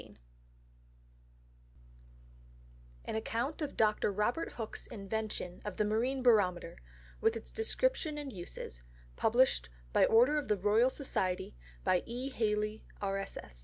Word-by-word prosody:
_An - - -2
Account 235 +7 -2
of 295 - -3
Dr. 215 -1 +3
Robert 210 +10 0
Hook's 225 -2 -5
Invention 200 -3 -4
of 205 -3 -5
the 210 - +2
Marine 245 +5 0
Barometer, 185 -8 +3 0.4
with 225 +1 +3
its 225 - -6
Description 445 -8 0
and 285 -3 -5
Uses; 175 - -7 0.3
published 240 - +3 0.2
by - - +6
order 250 +7 +5
of 290 - -6
the 210 - +2
Royal 210 +6 +4
Society, 185 - -1 0.3
by 180 - +3
E. 250 +3 -3
Halley, 215 -3 -1 0.2
R. 195 -1 -1
220 Hz, 120 wpm, -33 LUFS, 200-255 Hz, 0.4 s, by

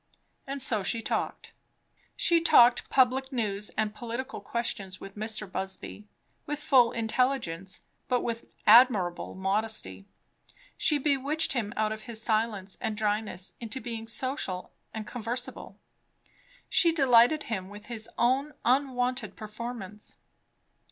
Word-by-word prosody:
And 275 -1 -1
so 235 -7 +3
she 225 +4 -1
talked. - - -3 0.6
She 340 -1 +3
talked 245 -7 +6
public 265 +1 +3
news 210 -5 -1
and 215 -1 0
political 240 +3 -5
questions 200 -5 -3
with 195 0 -10
Mr. 215 0 -3
Busby, 105 - -6 0.4
with 295 0 -2
full 260 -5 +4
intelligence, 220 -6 -1 0.3
but 250 -1 +2
with 230 -1 -3 0.2
admirable 210 -6 +5
modesty; 190 - -1 0.7
she 300 - +2
bewitched 290 +2 0
him 225 -6 -1
out 215 0 +1
of 215 0 -6
his 225 -2 -5
silence 215 -4 -1
and 220 -3 -2
dryness 210 -3 -2
into 235 +2 -5
being 230 -3 -6
social 230 -7 -2 0.2
and 220 -1 -5
conversible; 245 +2 -5 0.9
she 335 - +4
delighted 270 -1 +5
him 190 -4 -4
with 205 +1 -11
his 225 -1 -7
own 265 +5 +2
unwonted 255 0 +1
performance. 215 -2 -7
230 Hz, 125 wpm, -29 LUFS, 210-255 Hz, 0.9 s, talked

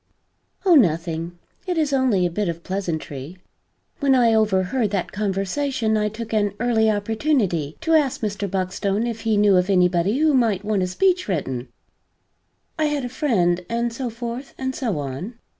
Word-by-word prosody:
"Oh 365 - +6
nothing. 170 - +2 0.3
It 355 -2 -1
is 300 -3 +1
only 250 -9 +2
a 175 - -1
bit 205 +1 -1
of 170 0 -5
pleasantry. 165 -5 -4 0.6
When 275 -3 +3
I 235 -3 +4
overheard 215 +2 +1
that 195 -3 -2
conversation 220 +4 -1
I 210 0 +1
took 225 +1 -7
an 205 -2 +1
early 225 -2 +2
opportunity 205 - 0
to 325 - +1
ask 295 -5 +2
Mr. 205 -2 -2
Buckstone 195 +3 -1
if 230 -2 -4
he 220 -2 +1
knew 205 -2 +5
of 180 +2 +1
anybody 180 +3 +2
who 310 0 +3
might 220 -7 +2
want 210 -2 +1
a 185 - 0
speech 360 - +1
written 135 - -2 1.1
I 310 - +3
had 295 -3 -1
a - - -4
friend, 185 - +1
and 235 0 -1
so 250 +1 -3
forth 235 +3 -6
and 260 0 -2
so 230 - -2
on. 145 - -5
210 Hz, 170 wpm, -22 LUFS, 185-245 Hz, 1.1 s, Oh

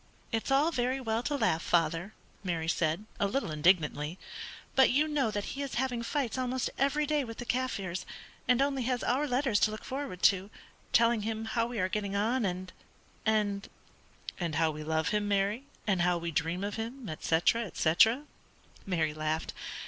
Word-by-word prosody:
"It's 225 +3 -1
all 280 +5 +4
very 255 -2 0
well 225 -3 -1
to 290 +4 -1
laugh, 220 - +2
father," 170 +4 +1 0.3
Mary 170 -4 -2
said, 165 +4 0
a 200 - +3
little 250 - -1
indignantly, 155 0 +2 0.6
"but 265 - +6
you 295 +5 +3
know 290 -6 +1
that 205 -1 -2
he 280 - -4
is 275 -3 -4
having 245 -1 0
fights 260 +1 -1
almost 255 0 -1
every 280 +3 +2
day 295 -1 +1
with 230 -2 -7
the 245 - -6
Kaffirs, 205 -8 -1 0.4
and 250 +2 +4
only 275 -1 0
has 245 0 -1
our 275 +5 +1
letters 250 -4 +2
to - - +4
look 215 0 -7
forward 265 -9 -5
to, 195 0 +4 0.4
telling 230 -1 +4
him 220 +1 -3
how 230 +1 0
we 240 -1 -5
are 185 - +2
getting 200 0 -2
on 225 +4 +1
and 185 0 -3 0.5
and 210 -2 +1 0.3
" - - -12
"And 170 -4 -2
how 160 0 +3
we 155 0 -6
love 160 0 0
him, 210 -1 0
Mary, 205 +5 +1 0.2
and 195 -5 +2
how 175 0 +3
we 170 0 -3
dream 165 +4 -1
of 205 +2 -3
him, 235 +2 -5
etc., 165 +8 +1
etc." 220 - +3 0.6
Mary 160 -5 +1
laughed. 155 +1 -2
215 Hz, 185 wpm, -31 LUFS, 175-255 Hz, 0.6 s, but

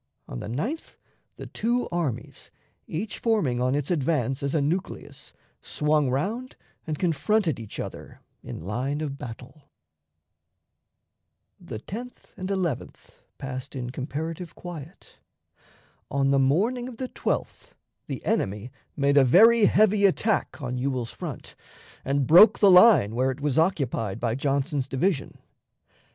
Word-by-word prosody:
On - - -6
the - - -6
9th 210 - -4 0.4
the - - -9
two 240 +3 -1
armies, 145 -9 -4 0.4
each 195 +8 -4
forming 175 - +1
on 130 +2 +1
its 145 +3 -2
advance 135 -5 0
as 140 +2 -1
a - - +3
nucleus, 160 +6 -3 0.3
swung 150 -2 +1
round 215 - -2 0.3
and 155 -1 -2
confronted 165 - +1
each 110 -3 -8
other - - -7 0.2
in - - -8
line 130 - -2
of 140 -3 -4
battle. 125 +5 -10 1.9
The - - -7
10th 230 - -9
and 185 0 -5
11th 180 -9 -3 0.3
passed 130 +1 -6
in 125 -2 -4
comparative 155 +6 -5
quiet. 170 -1 -10 0.9
On 135 0 +1
the 140 - +4
morning 215 - +1
of 240 - -11
the 255 0 -4
12th - - -3 0.3
the - - -6
enemy 105 +5 -1 0.3
made 140 0 +2
a 140 - +8
very 215 - +6
heavy 205 -1 +4
attack 205 0 0
on 125 0 -3
Ewell's 130 -3 -2
front, - - -8 0.5
and 140 0 0
broke 175 - +8
the 200 -2 +6
line 180 - +7
where 130 +3 +1
it 130 - -4
was 150 +1 +1
occupied 135 - 0
by 115 -2 0
Johnson's 140 +1 -1
division. 140 +2 -1
145 Hz, 135 wpm, -26 LUFS, 130-190 Hz, 1.9 s, a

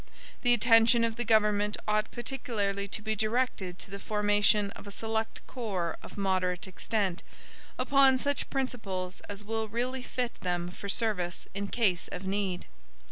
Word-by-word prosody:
The 245 -1 +5
attention 230 0 +5
of 230 -1 0
the 240 - -1
government 210 -2 +3
ought 215 0 +1
particularly 225 -6 -2
to 210 +2 -3
be 220 0 0
directed 215 -4 0
to 190 - -6
the 200 - -5
formation 205 0 +3
of - - -11
a - - -5
select 220 +2 -3
corps 195 -9 -3
of - - -11
moderate 185 -2 0
extent, 190 -1 -1 0.6
upon 270 0 +5
such 285 +2 -1
principles 200 -9 -3
as 205 0 -5
will 220 +1 -2
really 250 +4 -2
fit 250 -1 -3
them 175 -1 -1
for 200 +2 -7
service 195 -6 0
in 200 +1 -3
case 195 -6 +1
of 180 +2 -6
need. 190 -2 -1
210 Hz, 155 wpm, -30 LUFS, 195-235 Hz, 0.6 s, The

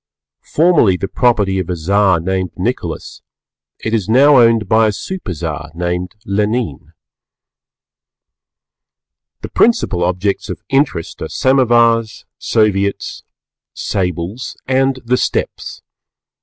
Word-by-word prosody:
Formerly 150 - +4
the 95 - -3
property 105 -5 +1
of 95 - -4
a 90 - -1
Czar 95 +2 +2
named 95 +1 -2
Nicholas, - - -4 0.6
it 110 - -4
is 110 -3 -1
now 135 +4 +6
owned 115 -3 +4
by 110 +2 +4
a - - +1
Superczar 85 - -6
named 90 +2 -3
Lenine. 105 - -2 2.5
The - - -6
principal 220 - +2
objects 90 +3 -1
of - - -6
interest 135 - -1
are - - -4
Samovars, 120 -4 +2
Soviets, 100 -3 0 0.5
Sables, 90 +6 -3
and 135 0 +1
the 125 +2 +2
Steppes. - - -3
105 Hz, 105 wpm, -16 LUFS, 90-120 Hz, 2.5 s, now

